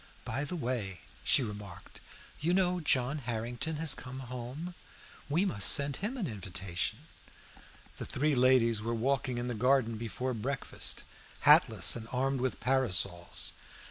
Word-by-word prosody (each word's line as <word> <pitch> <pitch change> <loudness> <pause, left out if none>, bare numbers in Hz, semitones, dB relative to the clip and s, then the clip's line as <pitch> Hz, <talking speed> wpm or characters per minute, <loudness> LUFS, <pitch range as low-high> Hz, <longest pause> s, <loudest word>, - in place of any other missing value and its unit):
"By 135 +5 -3
the 180 - -5
way," 120 - -4 0.2
she 135 - +4
remarked, 105 -4 -9 0.4
"you 170 +4 +1
know 180 -1 +1
John 140 -2 +1
Harrington 120 +5 -2
has 155 -1 +4
come 130 0 -8
home. 125 +7 -7 0.6
We 170 +7 +2
must 100 - +3
send 140 -1 +4
him 220 +7 -4
an 220 - -2
invitation." 95 - -4 0.9
The - - -7
three 150 +3 0
ladies 125 -4 +3
were 115 +2 -2
walking 130 +1 -1
in 120 0 -3
the 125 - -2
garden 115 -1 +1
after 125 +4 -3
breakfast, 130 +4 -2 0.4
hatless - - +6
and 115 -1 -6
armed 135 +1 -1
with 130 -2 -2
parasols. 110 -9 +1
125 Hz, 140 wpm, -31 LUFS, 115-140 Hz, 0.9 s, hatless